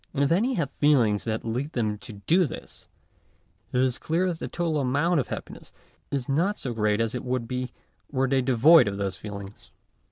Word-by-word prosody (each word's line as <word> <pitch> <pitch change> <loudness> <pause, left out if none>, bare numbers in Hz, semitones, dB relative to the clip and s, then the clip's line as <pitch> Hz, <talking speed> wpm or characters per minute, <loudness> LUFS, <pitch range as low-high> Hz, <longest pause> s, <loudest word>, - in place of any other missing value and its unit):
And 140 - +2
if 140 - +1
any 230 +10 +2
have 150 -6 -1
feelings 120 -9 +3
that 110 -1 -2
lead 125 +7 -3
them 105 -4 -1
to 110 - -9
do 160 - +2
this, - - -10 0.8
it 125 - +1
is 130 -1 0
clear 170 +4 0
that 165 -2 -4
the - - -4
total 165 -3 -1
amount 145 +6 +2
of 130 - -1
happiness - - -8 0.4
is 135 -3 -2
not 175 +9 +1
so 125 - -4
great 105 -1 +1
as 115 -1 0
it 125 - -4
would 125 -2 -2
be 125 0 -3 0.4
were 135 -1 +1
they 135 0 +2
devoid 130 +4 +6
of 100 -1 -2
those 100 -2 -2
feelings. 100 0 -9
130 Hz, 200 wpm, -26 LUFS, 110-150 Hz, 0.8 s, devoid